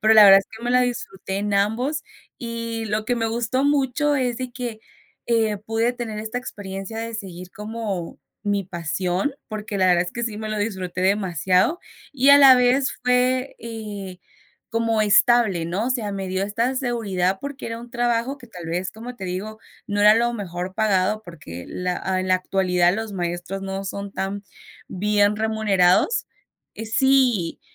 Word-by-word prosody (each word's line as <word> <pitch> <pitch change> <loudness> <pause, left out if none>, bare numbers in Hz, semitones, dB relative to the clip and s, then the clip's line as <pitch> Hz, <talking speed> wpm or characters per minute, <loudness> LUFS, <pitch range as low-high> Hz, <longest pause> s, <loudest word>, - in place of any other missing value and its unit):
pero 220 0 +5
la 215 - +10
verdad 195 -1 +10
es - - -13
que 230 - -12
me 245 - 0
la 250 - +5
disfruté 195 -6 -3
en 205 +1 -2
ambos. 240 +10 0 0.4
Y 230 -2 -4
lo 215 0 -1
que 245 +2 0
me 225 -1 0
gustó 235 +4 0
mucho 290 +1 +2
es 250 -3 0
de 255 -1 -5
que, 240 -3 -5 0.5
eh, 225 -3 +2
pude 225 +3 0
tener 235 -3 -5
esta 220 +3 -4
experiencia 205 -3 -7
de 230 0 -4
seguir 185 -4 -7
como 210 -4 -5 0.2
mi 205 -1 +1
pasión, 180 - -2
porque 210 -2 -5
la 185 - +4
verdad 175 -1 +4
es 175 - -7
que 235 - -4
sí 225 -3 -3
me 215 0 -5
lo 215 - -2
disfruté 190 -4 -3
demasiado, 190 - +2 0.3
y 270 0 +2
a 285 - +9
la 270 -2 +9
vez 250 +2 +3
fue, 250 +1 +1
eh, 210 -5 -7 0.5
como 230 -1 +1
estable, 210 -4 +4
¿no? 190 +7 -1
O - - -2
sea, 220 -5 -1
me 195 -1 -4
dio 185 +1 -1
esta 230 +6 0
seguridad 210 -8 0
porque 280 -1 -6
era 230 0 -4
un 235 +1 -11
trabajo 240 +2 0
que, 245 - -14
tal 180 -7 -10
vez, 175 +3 -2
como 240 +3 -9
te 190 - -7
digo, 205 +4 -5 0.3
no 205 0 -1
era 210 +1 +7
lo 235 +1 +2
mejor 185 -4 -5
pagado, 210 -1 +1
porque 90 - -9
la 180 -1 -3 0.2
en 185 - -3
la 185 - +5
actualidad 180 -1 +2
los 220 0 -4
maestros 175 +1 -3
no 195 0 -4
son 200 +1 -5
tan 195 +1 -3 0.5
bien 205 +2 +2
remunerados, 220 - +2 0.5
eh, 225 - -6
sí, 245 -6 +2
215 Hz, 180 wpm, -23 LUFS, 190-240 Hz, 0.5 s, la